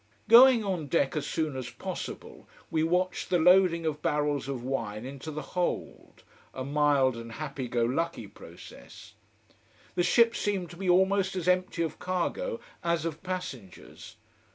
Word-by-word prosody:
Going 240 0 +8
on 180 -7 -2
deck 140 -3 +1
as 150 - -2
soon 155 -4 -2
as 130 -2 -5
possible, - - -7 0.2
we 160 - +1
watched 180 +3 0
the 180 - +3
loading 175 -1 +4
of 150 -1 -2
barrels 145 -2 0
of 135 -3 -4
wine 115 -4 -3
into 135 +3 -7
the 155 -1 -5
hold 180 -1 -3 0.3
a 130 - -4
mild 140 -2 +2
and 115 0 -8
happy 140 -2 -5
go 120 0 0
lucky 160 0 -2
process. 85 -9 -13 0.8
The - - 0
ship 230 +6 +4
seemed 195 -4 -2
to 175 - -11
be 190 0 -2
almost 190 +1 +3
as 180 -2 -3
empty 180 -2 +1
of 160 -2 -5
cargo 465 - -2 0.2
as 170 -2 0
of 165 -2 -4
passengers. 160 - -7
160 Hz, 155 wpm, -28 LUFS, 135-185 Hz, 0.8 s, Going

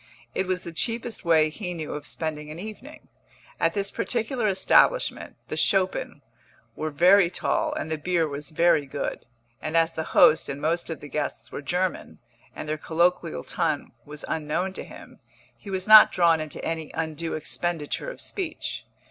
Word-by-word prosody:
It 190 - -1
was 185 -1 -1
the 170 - -6
cheapest 230 +6 -2
way 160 -3 +4
he 180 0 -5
knew 160 -2 -5
of 145 0 -6
spending 150 -2 -4
an 155 - -7
evening. 220 - -9 0.5
At - - +1
this 200 -1 -1
particular 235 -1 -1
establishment 205 - +3
the - - -4
Schoppen 185 -7 0 0.5
were 155 - -3
very 180 +5 +5
tall 180 - 0
and 160 - -4
the 160 - -2
beer 170 0 +1
was 145 +1 -6
very 160 -3 +3
good; 140 -2 -4 0.3
and 155 +2 -1
as 165 0 +3
the 160 - -3 0.2
host 155 - +6
and 140 - -4
most 165 +4 -1
of 160 -3 -5
the 150 - -8
guests 150 0 -4
were - - -5
German, 180 +6 -2 0.4
and - - -6
their 155 0 -2
colloquial 160 - 0
tongue - - -1
was 150 +1 -8
unknown 160 +5 -2
to - - -5
him, - - -13 0.4
he 200 - -12
was 190 0 -3
not 215 0 +10
drawn 170 -3 +3
into 155 -1 -6
any 160 -2 -3
undue 160 0 -3
expenditure 160 - -3
of - - -9
speech. 350 -6 -4
165 Hz, 175 wpm, -25 LUFS, 155-190 Hz, 0.5 s, not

